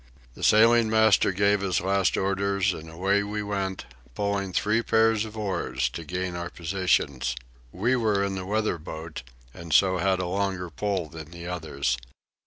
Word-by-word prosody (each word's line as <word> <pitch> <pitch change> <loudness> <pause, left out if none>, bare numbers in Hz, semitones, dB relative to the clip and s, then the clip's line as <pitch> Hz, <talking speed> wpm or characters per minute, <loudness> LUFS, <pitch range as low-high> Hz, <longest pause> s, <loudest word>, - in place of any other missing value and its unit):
The - - -13
sailing 115 +1 +5
master 110 -3 +4
gave 100 +1 +2
his 95 -2 +1
last 95 0 +1
orders, 100 0 +1
and 80 -1 -9
away 95 +5 +1
we 105 +1 -3
went, 95 -4 -3 0.3
pulling 100 -1 -1
three 105 +5 +1
pairs 110 -1 +2
of 110 0 -9
oars 85 - -1
to 80 +7 -7
gain 90 +2 -3
our 85 0 -4
positions. 80 -8 0 0.4
We 115 +8 +1
were 105 -5 +1
in 100 0 -1
the 95 -1 -5
weather 105 -4 0
boat, 80 +1 -7 0.3
and 85 -1 -9
so 95 +2 +4
had 95 -1 +2
a 90 - -1
longer 95 -1 -2
pull 95 -1 -2
than 80 -1 -10
the 85 0 -9
others. 75 -8 -2
95 Hz, 170 wpm, -26 LUFS, 85-105 Hz, 0.4 s, sailing